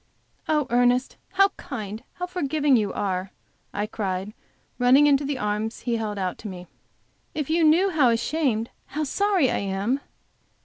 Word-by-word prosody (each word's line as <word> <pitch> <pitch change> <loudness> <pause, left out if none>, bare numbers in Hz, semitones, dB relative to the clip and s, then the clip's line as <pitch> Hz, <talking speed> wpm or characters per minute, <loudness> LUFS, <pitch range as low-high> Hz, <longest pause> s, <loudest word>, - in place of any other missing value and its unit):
"Oh, 300 -2 +2
Ernest, 245 +1 +2 0.2
how 390 +1 +5
kind, 215 -4 -6
how 360 - -4
forgiving 305 -5 +1
you 210 -4 +1
are?", 190 -1 -2 0.4
I 205 +1 -2
cried, 200 -2 -3 0.5
running 255 +4 +6
into 285 -1 +4
the 280 -1 -2
arms 210 0 -2
he 235 -2 -1
held 215 -2 -3
out 185 -2 -2
to 215 - -7
me, 180 -2 -8 0.7
"If 300 0 -2
you 330 +1 +3
knew 340 +5 +4
how 295 -7 +4
ashamed, 235 -1 0 0.2
how 305 +2 -3
sorry, 370 -2 +2
I - - 0
am!" 200 +7 -1
245 Hz, 160 wpm, -25 LUFS, 210-300 Hz, 0.7 s, running